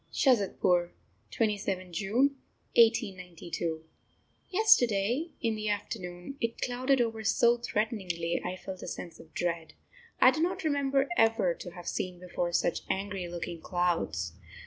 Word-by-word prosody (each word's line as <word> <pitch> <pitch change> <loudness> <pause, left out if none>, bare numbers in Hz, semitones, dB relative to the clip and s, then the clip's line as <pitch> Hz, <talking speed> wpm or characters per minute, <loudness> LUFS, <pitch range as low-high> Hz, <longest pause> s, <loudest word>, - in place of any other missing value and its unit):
SHAZADPUR, 190 - +2 0.4
27th 200 -4 -1
June 230 +11 +2 0.4
1892. 180 -7 +1 0.7
Yesterday, 250 - +3
in 225 -1 +2
the 215 -1 -2
afternoon, 195 +2 -4
it 230 0 -2
clouded 255 +2 +1
over 225 -2 0
so 235 +3 +4
threateningly, 200 -8 -1
I 180 +1 -3
felt 185 0 -8
a - - -7
sense 170 - -7
of 160 - -14
dread. 170 -2 -2 0.5
I - - +8
do 315 - -2
not 365 +2 0
remember 280 -2 +2
ever 225 - +3
to 175 - -8
have 175 -1 -10
seen 180 -1 -2
before 175 -1 -2
such 170 - +1
angry 195 -2 -2
looking 170 -1 -5
clouds. 170 - -1
195 Hz, 130 wpm, -30 LUFS, 175-240 Hz, 0.7 s, I